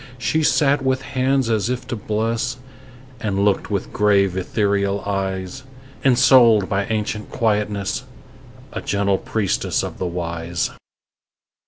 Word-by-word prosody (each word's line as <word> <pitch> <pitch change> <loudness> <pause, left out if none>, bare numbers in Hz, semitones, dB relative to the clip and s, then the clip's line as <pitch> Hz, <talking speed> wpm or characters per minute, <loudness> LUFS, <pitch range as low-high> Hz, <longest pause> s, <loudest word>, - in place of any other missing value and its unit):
She 155 +5 0
sat 145 -2 +3
with 130 0 0
hands 135 -1 0
as 110 0 0
if 125 0 -3
to - - -2
bless, 115 +3 -2 0.6
And 100 -2 0
looked 100 -2 +1
with 100 -3 -3
grave, 100 -2 +3
ethereal 100 +1 0
eyes; 95 -2 -3 0.4
Ensouled 120 -5 +5
by 100 0 0
ancient 105 -1 -2
quietness, 105 0 -1 0.7
A - - -4
gentle 100 -1 0
priestess 105 -4 -1
of - - -6
the 90 - -1
Wise. 85 -1 -3
105 Hz, 125 wpm, -21 LUFS, 100-120 Hz, 0.7 s, Ensouled